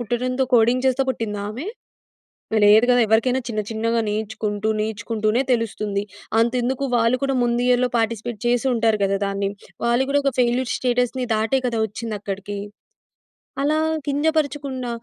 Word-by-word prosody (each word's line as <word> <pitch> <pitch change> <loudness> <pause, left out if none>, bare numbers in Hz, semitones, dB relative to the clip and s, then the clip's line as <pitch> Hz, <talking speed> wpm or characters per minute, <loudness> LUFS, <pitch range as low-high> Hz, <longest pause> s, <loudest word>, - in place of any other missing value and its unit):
పుట్టడంతో 250 +3 -1
coding 240 +2 +3
చేస్తా 260 +1 +2
పుట్టిందామె? 215 - -4 1.0
లేదు 215 +3 +6
గదా! 245 0 +5
ఎవరికైనా 230 +4 +2
చిన్న 215 -2 -2
చిన్నగా 230 +1 0
నేర్చుకుంటూ, 215 0 -2
నేర్చుకుంటూనే 215 +2 -1
తెలుస్తుంది. 215 -3 -1 0.4
అంతెందుకు 250 +3 0
వాళ్ళు 230 +2 +3
కూడా 270 -1 0
ముందియర్‌లో 245 +1 +2
పార్టిసిపేట్ 225 0 -2
చేసుంటారు 240 -3 +2
గదా! 195 0 +1
దాన్ని. 200 0 -1 0.4
వాళ్ళు 240 +3 +2
గూడా 285 +1 +3
ఒక 275 - +2
ఫెయిల్యూర్స్ 245 +1 +1
స్టేటస్‌ని 250 0 0
దాటే 225 +5 +1
కదా! 230 -2 -1
ఒచ్చిందక్కడికి. 205 -2 -5 1.0
అలా 300 +2 +2 0.3
కింజపరచకుండా 285 -3 -1
235 Hz, 120 wpm, -22 LUFS, 215-255 Hz, 1.0 s, లేదు